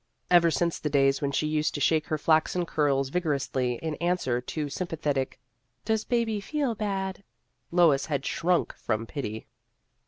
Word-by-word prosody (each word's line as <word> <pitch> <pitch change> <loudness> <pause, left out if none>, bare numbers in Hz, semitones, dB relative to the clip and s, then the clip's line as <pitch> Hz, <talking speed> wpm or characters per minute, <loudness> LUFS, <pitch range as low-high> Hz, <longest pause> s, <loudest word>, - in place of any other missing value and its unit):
Ever 170 -1 +6
since 170 +2 0
the 150 - -2
days 135 -1 +3
when 140 -1 0
she 140 - 0
used 155 0 0
to - - -2
shake 155 +2 +2
her 155 - 0
flaxen 160 +3 +2
curls 140 -4 +1
vigorously 135 -6 -1
in 160 -1 -1
an 175 +1 +3
swer 125 -7 -1
to 150 -2 -2
sympathetic, 150 -4 -2 0.2
" 125 -1 -47
Does 220 -1 0
baby 230 -4 0
feel 280 +2 -1
bad? 195 -2 -3 0.2
" - - -49
Lois 165 -6 +4
had 140 -3 -2
shrunk 175 +1 +1
from 110 0 -2
pity. 110 -4 -5
155 Hz, 175 wpm, -27 LUFS, 140-180 Hz, 0.2 s, Ever